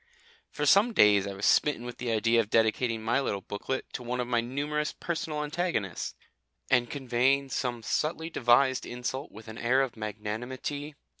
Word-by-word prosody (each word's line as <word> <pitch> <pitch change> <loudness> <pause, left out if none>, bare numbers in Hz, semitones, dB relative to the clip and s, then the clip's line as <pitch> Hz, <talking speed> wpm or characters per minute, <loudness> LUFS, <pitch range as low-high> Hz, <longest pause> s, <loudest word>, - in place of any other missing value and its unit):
For 150 - -3
some 200 +10 +5
days 105 - +5
I 100 - -4
was 100 - -3
smitten 145 -5 +3
with 125 - -8
the 125 -1 -3
idea 115 +1 +3
of 110 -2 0
dedicating 115 0 +1
my 120 +5 +2
little 100 -7 -2
booklet 115 +8 -4
to - - -4
one 125 +1 -3
of 125 - -1
my 120 -1 +2
numerous 145 +5 -2
personal 160 -3 -3
antagonists, 150 - -2 0.6
and 120 -2 +3
conveying 135 +1 +1
some 120 -3 -2
subtly 160 +6 -1
devised 130 0 +3
insult 125 +3 -4
with 110 +2 -12
an 110 +1 -8
air 130 +3 +3
of 130 - -4
magnanimity. 120 +7 -5
125 Hz, 170 wpm, -29 LUFS, 115-140 Hz, 0.6 s, some